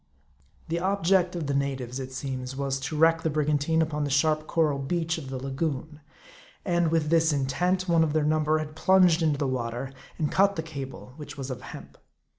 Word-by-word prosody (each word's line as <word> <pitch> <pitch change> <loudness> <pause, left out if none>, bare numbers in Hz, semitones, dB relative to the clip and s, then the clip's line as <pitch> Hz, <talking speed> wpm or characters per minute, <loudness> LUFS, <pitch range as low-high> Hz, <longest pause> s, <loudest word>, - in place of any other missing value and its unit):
The 170 +1 0
object 185 -1 +2
of 165 -3 -3
the 140 - -1
natives, 135 -2 -2
it 130 0 -6
seems, 130 -1 -5
was 135 0 -2
to 150 +3 -4
wreck 165 +1 +4
the 160 - 0
brigantine 150 +1 +1
upon 150 -1 -2
the 145 - -1
sharp 155 +2 +2
coral 155 -4 +1
beach 165 +3 -1
of 135 -4 -9
the 135 - -4
lagoon. 140 +3 -3 0.7
And 175 -3 +2
with 160 -2 +1
this 165 -1 +4
intent, 175 +7 0
one 165 -2 +4
of 155 -2 0
their 155 -1 +2
number 155 0 +2
had 155 -1 -5
plunged 180 -1 +4
into 155 -3 +2
the 140 -1 -1
water, 125 +1 -3 0.2
and 150 -2 -1
cut 200 +1 +3
the 160 - -3
cable, 135 -5 -8
which 150 -1 -9
was 135 -1 -5
of 125 - -6
hemp. - - -11
155 Hz, 200 wpm, -27 LUFS, 135-165 Hz, 0.7 s, wreck